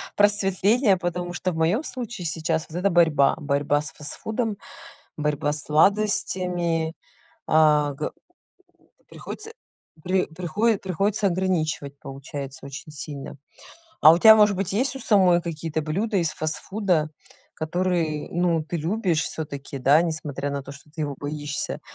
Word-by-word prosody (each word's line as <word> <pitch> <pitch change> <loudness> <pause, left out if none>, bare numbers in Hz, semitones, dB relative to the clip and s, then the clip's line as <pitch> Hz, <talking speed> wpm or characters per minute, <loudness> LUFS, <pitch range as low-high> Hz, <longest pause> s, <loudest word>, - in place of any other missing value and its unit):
просветление, 205 +2 +3
потому 175 0 -3
что 185 +1 -2
в - - -6
моём 165 - +1
случае 240 - -6
сейчас 160 0 -1
вот 160 - -6
эта 190 +3 +2
борьба: 160 -5 +4
борьба 145 -1 0
с 150 - -7
фастфудом, 215 - -4 0.6
борьба 150 -1 0
с 150 - -4
сладостями 175 -2 +1 0.5
а, 150 -2 +4
го - - -4 1.0
приходится 440 +1 -8 0.5
при 185 0 +1
прихои 185 +7 0
приходится 195 +3 0
ограничивать, 160 -6 -1
получается, 135 0 -8
очень 140 +3 -8
сильно. 145 -2 -7 0.6
А 155 - +9
у 170 - +3
тя 220 +3 +9
может 210 -2 +4
быть 190 -1 -2
есть 260 +7 0
у - - -7
самой 185 -7 +4
какие-то 160 -1 -3
блюда 200 +8 -1
из 165 -3 +1
фастфуда, 155 +1 -1 0.4
которые 165 -2 -1
ну 170 -2 +1
ты 170 - -4
любишь 175 0 0
всё-таки, 140 -3 -6
да, 140 +5 +5
несмотря 150 -4 -3
на 140 0 -3
то 135 - -9
что 140 +2 -15
ты 155 +1 -5
его 145 -1 -3
боишься? 145 0 -4
165 Hz, 140 wpm, -24 LUFS, 150-190 Hz, 1.0 s, А